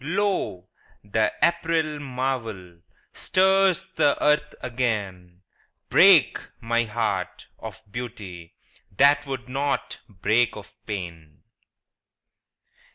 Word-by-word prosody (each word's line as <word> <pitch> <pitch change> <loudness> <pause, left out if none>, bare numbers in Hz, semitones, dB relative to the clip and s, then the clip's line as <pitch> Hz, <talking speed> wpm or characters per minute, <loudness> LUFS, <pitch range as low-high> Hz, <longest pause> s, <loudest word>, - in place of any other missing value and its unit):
Lo, 160 - -1 0.4
the 110 +2 0
April 160 -3 +1
marvel 125 -10 -4 0.3
Stirs 190 -1 +2
the 145 -2 +3
earth 150 0 +1
again: 100 -8 -3 0.5
Break, - - +6 0.2
my 115 +1 0
heart, 105 -4 -3
of 110 - -9
beauty, 100 -8 -8 0.4
That 140 +1 +4
would 130 -3 -5
not 140 +2 -2
break 110 +5 +1
of 105 0 -11
pain 85 -7 -7
120 Hz, 90 wpm, -24 LUFS, 100-145 Hz, 0.5 s, Break